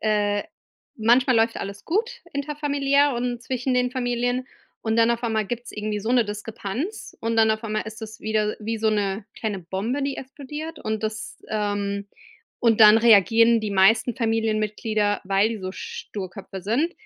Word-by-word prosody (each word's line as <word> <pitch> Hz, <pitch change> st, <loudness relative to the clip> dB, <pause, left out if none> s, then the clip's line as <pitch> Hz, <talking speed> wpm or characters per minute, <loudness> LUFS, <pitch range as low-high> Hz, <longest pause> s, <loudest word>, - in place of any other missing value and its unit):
äh 205 Hz, -1 st, +1 dB, 0.6 s
manchmal 245 Hz, +2 st, +4 dB
läuft 225 Hz, +1 st, +2 dB
alles 200 Hz, 0 st, -6 dB
gut 430 Hz, +8 st, 0 dB, 0.2 s
interfamiliär 285 Hz, -1 st, +1 dB
und 240 Hz, 0 st, -2 dB
zwischen 255 Hz, +1 st, -2 dB
den 250 Hz, 0 st, +1 dB
Familien 245 Hz, 0 st, -1 dB, 0.4 s
und 225 Hz, 0 st, 0 dB
dann 230 Hz, +1 st, +5 dB
auf 235 Hz, +1 st, -4 dB
einmal 220 Hz, -3 st, 0 dB
gibt's 240 Hz, +1 st, -5 dB
irgendwie 210 Hz, 0 st, -3 dB
so 220 Hz, +4 st, -3 dB
'ne 245 Hz, -2 st, +4 dB
Diskrepanz 210 Hz, -, -5 dB
und 230 Hz, 0 st, -1 dB
dann 220 Hz, 0 st, +5 dB
auf 220 Hz, +1 st, -4 dB
einmal 215 Hz, -1 st, -2 dB
ist 220 Hz, +1 st, -8 dB
es 220 Hz, 0 st, -8 dB
wieder, 215 Hz, -1 st, 0 dB
wie 225 Hz, +1 st, -3 dB
so 220 Hz, 0 st, +2 dB
'ne 200 Hz, -1 st, -1 dB
kleine 205 Hz, -4 st, -3 dB
Bombe, 205 Hz, +11 st, -3 dB
die 275 Hz, 0 st, -2 dB
explodiert 295 Hz, +4 st, -7 dB
und 220 Hz, -1 st, -2 dB
das, 215 Hz, 0 st, -5 dB
ähm 205 Hz, -1 st, -2 dB, 0.5 s
und 230 Hz, -2 st, +3 dB
dann 215 Hz, +1 st, +9 dB
reagieren 230 Hz, +1 st, +5 dB
die 215 Hz, -1 st, -3 dB
meisten 220 Hz, +5 st, +4 dB
Familienmitglieder, 215 Hz, -2 st, 0 dB
weil 195 Hz, +3 st, +3 dB
die 225 Hz, -2 st, -4 dB
so 185 Hz, 0 st, -4 dB
Sturköpfe 195 Hz, -1 st, -7 dB
sind, 260 Hz, -, 0 dB
225 Hz, 165 wpm, -24 LUFS, 210-245 Hz, 0.6 s, dann